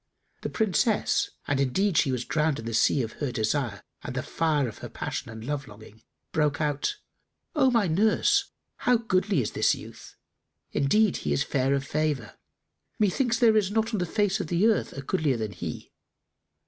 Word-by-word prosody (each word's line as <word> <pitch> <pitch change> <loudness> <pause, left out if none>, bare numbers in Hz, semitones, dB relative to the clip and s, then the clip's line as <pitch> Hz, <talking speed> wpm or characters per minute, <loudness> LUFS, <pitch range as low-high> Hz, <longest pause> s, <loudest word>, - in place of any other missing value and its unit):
The - - -3
Princess 235 - +1 0.2
(and 140 -1 +1
indeed 180 +9 +1
she 140 -3 +3
was 125 -1 -2
drowned 155 -1 +1
in 115 - -7
the 115 - -4
sea 125 +4 +3
of 110 - -5
her 140 -4 -1
desire 115 0 -1 0.2
and 125 - -6
the 130 - -2
fire 155 -5 0
of 110 - -8
her - - -7
passion - - -5
and 110 0 -8
love 145 +1 -3
longing) 110 +1 -14 0.3
broke 150 -2 +1
out, 150 - -1 0.6
"O 275 -4 +4
my 230 -4 +3
nurse, 220 - +3 0.3
how 250 -1 +3
goodly 195 - +1
is 105 - -3
this - - +2
youth! - - -12 0.6
Indeed 210 +8 +2
he 75 - -1
is 70 - +1
fair 135 0 +1
of 135 0 -2
favour. 145 -7 -2 0.6
Methinks, 230 +4 +2
there 225 -2 +5
is 205 -3 +3
not 225 +2 0
on 210 - 0
the 180 - -1
face 205 +1 +1
of 155 - -4
earth 210 +6 +2
a 140 - -7
goodlier 150 -5 0
than 110 -2 -3
he!" - - -7
155 Hz, 185 wpm, -27 LUFS, 130-215 Hz, 0.6 s, there